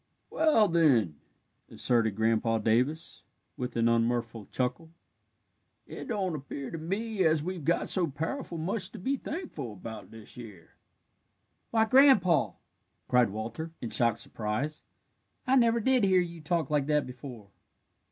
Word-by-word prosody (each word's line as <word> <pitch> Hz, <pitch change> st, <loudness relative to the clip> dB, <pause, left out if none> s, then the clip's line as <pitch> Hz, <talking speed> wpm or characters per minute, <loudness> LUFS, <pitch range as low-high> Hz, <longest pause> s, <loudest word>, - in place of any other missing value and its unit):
"Well, 305 Hz, -10 st, +4 dB
then," 135 Hz, -, +3 dB, 0.5 s
asserted 115 Hz, -4 st, 0 dB
Grandpa 115 Hz, +1 st, +1 dB
Davis, 125 Hz, +9 st, -1 dB, 0.3 s
with 125 Hz, -3 st, -5 dB
an 115 Hz, 0 st, +2 dB
unmirthful 115 Hz, -1 st, 0 dB
chuckle, 130 Hz, +6 st, -2 dB, 1.0 s
"it -, -, -8 dB
don't 195 Hz, -7 st, -1 dB
appear 140 Hz, -2 st, -6 dB
to 165 Hz, -, -5 dB
me 200 Hz, +5 st, -2 dB
as 160 Hz, -2 st, +2 dB
we've 180 Hz, -2 st, -5 dB
got 170 Hz, +4 st, +1 dB
so 180 Hz, -3 st, +2 dB
powerful 165 Hz, -, -4 dB
much 185 Hz, +5 st, -1 dB
to -, -, -8 dB
be 265 Hz, +9 st, -1 dB
thankful 270 Hz, -, -6 dB
about 110 Hz, +3 st, -9 dB
this 110 Hz, +3 st, -13 dB
year." 105 Hz, -8 st, -11 dB, 1.0 s
"Why, 225 Hz, -1 st, +3 dB
Grandpa!" 220 Hz, -, +5 dB, 0.5 s
cried 125 Hz, -3 st, +3 dB
Walter, 115 Hz, +10 st, -6 dB
in 120 Hz, -, -6 dB
shocked 115 Hz, -1 st, +2 dB
surprise, 115 Hz, +9 st, -4 dB, 0.6 s
"I 260 Hz, 0 st, +3 dB
never 235 Hz, -2 st, +4 dB
did 255 Hz, +1 st, +2 dB
hear 190 Hz, -2 st, +4 dB
you 170 Hz, -2 st, -6 dB
talk 160 Hz, +1 st, -1 dB
like 145 Hz, -2 st, +1 dB
that 150 Hz, -1 st, +2 dB
before." 125 Hz, -4 st, -10 dB
150 Hz, 140 wpm, -29 LUFS, 115-185 Hz, 1.0 s, Grandpa